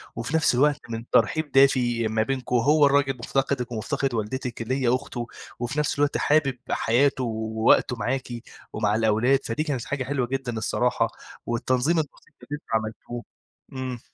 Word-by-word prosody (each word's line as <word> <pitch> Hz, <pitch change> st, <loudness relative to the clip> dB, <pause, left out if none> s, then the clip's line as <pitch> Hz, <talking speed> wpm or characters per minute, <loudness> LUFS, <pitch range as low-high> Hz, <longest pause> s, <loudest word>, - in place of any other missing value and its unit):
وفي 120 Hz, +8 st, -3 dB
نفس 160 Hz, -6 st, +3 dB
الوقت 145 Hz, +2 st, +3 dB
من 115 Hz, +1 st, -6 dB
ترحيب 145 Hz, +6 st, +2 dB
دافي 125 Hz, -4 st, +4 dB
ما 110 Hz, 0 st, +1 dB
بينكم، 130 Hz, 0 st, -2 dB
هو 145 Hz, +5 st, +5 dB
الراجل 140 Hz, -2 st, +2 dB
مفتقدِك 130 Hz, 0 st, -1 dB
ومفتقد 135 Hz, +3 st, -2 dB
والدتِك 120 Hz, +2 st, -3 dB
اللي 130 Hz, +3 st, -1 dB
هي 120 Hz, -, +2 dB
أخته، 120 Hz, -2 st, -5 dB, 0.3 s
وفي 130 Hz, +5 st, -2 dB
نفس 145 Hz, -1 st, 0 dB
الوقت 145 Hz, 0 st, +2 dB
حابب 145 Hz, -4 st, +2 dB
حياته 130 Hz, +3 st, +2 dB
ووقته 110 Hz, +1 st, +2 dB
معاكِ، 125 Hz, +3 st, -2 dB, 0.4 s
ومع 105 Hz, -1 st, +1 dB
الأولاد 115 Hz, +5 st, +3 dB
فدي 115 Hz, +7 st, -1 dB
كانت 135 Hz, -7 st, -3 dB
حاجة 145 Hz, -2 st, -2 dB
حلوة 130 Hz, -2 st, -1 dB
جدًا 130 Hz, -3 st, -3 dB
الصراحة، 115 Hz, +1 st, +1 dB, 0.4 s
والتنظيم 130 Hz, +7 st, +1 dB
الأُسري 150 Hz, 0 st, -7 dB
اللي 145 Hz, -, -9 dB
أنتم 150 Hz, -, -13 dB
عملتوه، 110 Hz, +2 st, -3 dB, 0.5 s
امم. 130 Hz, -2 st, -4 dB
125 Hz, 155 wpm, -25 LUFS, 115-140 Hz, 0.5 s, هو